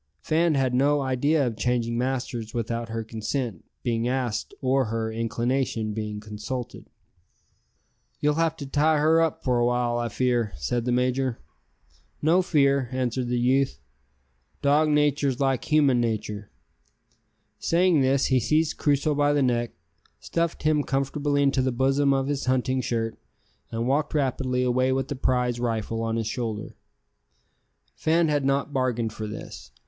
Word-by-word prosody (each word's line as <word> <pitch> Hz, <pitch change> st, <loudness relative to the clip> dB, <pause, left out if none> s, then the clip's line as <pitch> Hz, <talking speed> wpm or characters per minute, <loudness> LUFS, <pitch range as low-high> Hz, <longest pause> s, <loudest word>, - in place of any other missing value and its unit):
Fan 160 Hz, -, +1 dB
had 130 Hz, -2 st, +1 dB
no 140 Hz, +3 st, +3 dB
idea 140 Hz, +3 st, +1 dB
of 120 Hz, -3 st, -2 dB
changing 120 Hz, 0 st, 0 dB
masters 120 Hz, -2 st, -3 dB
without 115 Hz, 0 st, -3 dB
her 115 Hz, 0 st, -3 dB
consent 110 Hz, -, -4 dB, 0.2 s
being 115 Hz, -1 st, 0 dB
asked 125 Hz, -4 st, -2 dB
or 130 Hz, 0 st, +2 dB
her 110 Hz, 0 st, -2 dB
inclination 115 Hz, 0 st, -1 dB
being 105 Hz, -1 st, -4 dB
consulted. 110 Hz, +4 st, -6 dB, 1.3 s
"You'll 150 Hz, 0 st, +2 dB
have 160 Hz, +1 st, 0 dB
to 140 Hz, -, -6 dB
tie 150 Hz, +3 st, +2 dB
her 160 Hz, +2 st, +4 dB
up 165 Hz, -2 st, -1 dB
for 125 Hz, -2 st, +1 dB
a 120 Hz, -, +3 dB
while, 120 Hz, -1 st, 0 dB
I 120 Hz, 0 st, -2 dB
fear," 120 Hz, -2 st, 0 dB
said 115 Hz, -, -2 dB
the 125 Hz, -, 0 dB
major. 125 Hz, 0 st, 0 dB, 0.8 s
"No 165 Hz, +5 st, +3 dB
fear," 140 Hz, -7 st, +2 dB
answered 130 Hz, -1 st, -1 dB
the 125 Hz, 0 st, 0 dB
youth. 130 Hz, +3 st, +2 dB, 0.9 s
"Dog 150 Hz, +2 st, +4 dB
natur's 145 Hz, -3 st, +2 dB
like 135 Hz, -2 st, 0 dB
human 145 Hz, -5 st, +3 dB
natur'!" 105 Hz, -3 st, -3 dB, 1.1 s
Saying 170 Hz, -2 st, +3 dB
this 135 Hz, +1 st, +2 dB
he 130 Hz, -1 st, +3 dB
seized 155 Hz, +6 st, +1 dB
Crusoe 145 Hz, +1 st, +1 dB
by 145 Hz, 0 st, +2 dB
the 145 Hz, -1 st, +2 dB
neck, 120 Hz, -2 st, 0 dB, 0.5 s
stuffed 170 Hz, -1 st, -2 dB
him 155 Hz, -1 st, +3 dB
comfortably 145 Hz, +1 st, 0 dB
into 140 Hz, -1 st, +2 dB
the 130 Hz, 0 st, +1 dB
bosom 135 Hz, +3 st, +2 dB
of 135 Hz, -1 st, +1 dB
his 140 Hz, 0 st, -2 dB
hunting 130 Hz, 0 st, +1 dB
shirt, 115 Hz, -2 st, -2 dB, 0.5 s
and 115 Hz, +1 st, -2 dB
walked 145 Hz, +3 st, 0 dB
rapidly 130 Hz, -2 st, 0 dB
away 130 Hz, +1 st, +2 dB
with 135 Hz, 0 st, -1 dB
the 145 Hz, -, -2 dB
prize 125 Hz, -2 st, 0 dB
rifle 115 Hz, -1 st, -2 dB
on 115 Hz, 0 st, -1 dB
his 115 Hz, -1 st, -1 dB
shoulder. 110 Hz, -2 st, -4 dB, 1.2 s
Fan 165 Hz, 0 st, +2 dB
had 145 Hz, -2 st, +1 dB
not 140 Hz, +1 st, 0 dB
bargained 120 Hz, -4 st, 0 dB
for 110 Hz, 0 st, -5 dB
this. 105 Hz, -, -9 dB
130 Hz, 155 wpm, -25 LUFS, 120-145 Hz, 1.3 s, her